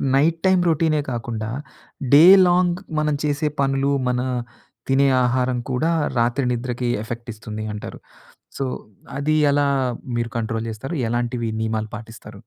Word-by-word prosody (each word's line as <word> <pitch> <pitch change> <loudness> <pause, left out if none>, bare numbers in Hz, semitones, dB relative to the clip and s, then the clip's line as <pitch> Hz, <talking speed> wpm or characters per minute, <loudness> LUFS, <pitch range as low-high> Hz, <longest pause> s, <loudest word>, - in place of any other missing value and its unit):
Night 160 +4 +3
time 185 -1 +4
రొటీనే 155 -1 +2
కాకుండా, 115 -2 -4 0.6
day 150 +3 +9 0.2
long 175 0 +2 0.2
మనం 150 -1 +1
చేసే 150 +1 0
పనులు, 135 0 +1 0.2
మన 125 0 0 0.7
తినే 135 +1 +3 0.2
ఆహారం 125 0 +1
కూడా 155 +7 +1 0.3
రాత్రి 120 +3 +1
నిద్రకి 125 0 -2 0.2
ఎఫెక్ట్ 115 +1 -7
ఇస్తుంది 110 0 -7
అంటారు. 105 - -7 0.6
సో 135 - -2 0.5
అది 155 +2 +1 0.2
ఎలా 145 0 +2 0.5
మీరు 115 -1 -2
కంట్రోల్ 115 0 -3
జేస్తారు? 135 +9 -5
ఎలాంటివి 120 0 -1
నియమాలు 110 -1 -2
పాటిస్తారు? 110 -1 -11
125 Hz, 130 wpm, -22 LUFS, 115-145 Hz, 0.7 s, day